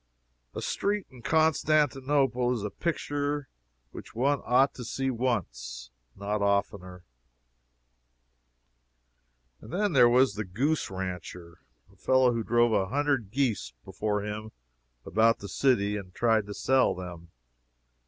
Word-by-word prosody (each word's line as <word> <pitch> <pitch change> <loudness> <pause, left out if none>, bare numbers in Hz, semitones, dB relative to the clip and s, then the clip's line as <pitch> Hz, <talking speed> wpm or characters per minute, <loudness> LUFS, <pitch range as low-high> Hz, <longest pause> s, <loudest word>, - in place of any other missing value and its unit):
A - - -4
street 205 -1 -1
in 125 -2 -14
Constantinople 145 -4 +2
is 110 - -4
a 105 - -3
picture 145 -3 -2 0.4
which - - -11
one 140 +4 +1
ought 130 +3 +3
to 125 - -8
see 135 +3 -2
once 60 - -3 0.2
not 105 +1 -3
oftener. 100 -3 -1 2.6
And 110 - -12
then 200 0 0
there 125 -3 +6
was 125 -2 +4
the 105 +1 -3
goose 130 +12 -1
rancher 90 -2 -7 0.3
a - - -23
fellow 130 +5 +3
who 115 -1 -2
drove 120 +1 +3
a 95 -2 +1
hundred 140 -4 0
geese 115 - -1
before 105 +2 -2
him 105 +1 -6 0.5
about 115 +2 +3
the 100 - -8
city, 105 -2 +1
and 95 -3 -8
tried 110 -3 +2
to 105 - -7
sell 130 -1 +2
them. 90 -2 -9
115 Hz, 130 wpm, -28 LUFS, 100-135 Hz, 2.6 s, there